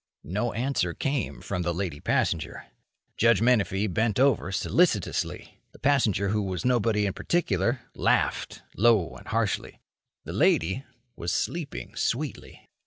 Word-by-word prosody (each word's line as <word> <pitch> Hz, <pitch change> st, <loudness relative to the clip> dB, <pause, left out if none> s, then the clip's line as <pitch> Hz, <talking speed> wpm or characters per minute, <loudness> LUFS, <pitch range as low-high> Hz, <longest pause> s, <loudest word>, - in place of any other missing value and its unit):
No 105 Hz, +8 st, -1 dB
answer 115 Hz, -8 st, -1 dB
came 135 Hz, -4 st, -2 dB
from 90 Hz, -3 st, -3 dB
the 85 Hz, -1 st, -1 dB
lady 85 Hz, -6 st, -3 dB
passenger. 80 Hz, +1 st, -1 dB, 0.5 s
Judge 115 Hz, -2 st, +4 dB
Menefee 105 Hz, -4 st, +2 dB
bent 110 Hz, +3 st, 0 dB
over 130 Hz, -7 st, +3 dB
solicitously. 105 Hz, -, 0 dB
The -, -, -14 dB
passenger 115 Hz, -9 st, +2 dB
who 105 Hz, +1 st, +1 dB
was 95 Hz, -1 st, -3 dB
nobody 115 Hz, -4 st, +2 dB
in 100 Hz, -, -1 dB
particular 120 Hz, -, 0 dB
laughed -, -, 0 dB
low 110 Hz, -5 st, +3 dB
and -, -, -13 dB
harshly. -, -, -1 dB, 0.4 s
The -, -, -7 dB
lady 95 Hz, -, +2 dB, 0.3 s
was 85 Hz, -, -3 dB
sleeping 160 Hz, -, -3 dB
sweetly. -, -, -3 dB
105 Hz, 130 wpm, -27 LUFS, 95-125 Hz, 0.5 s, Judge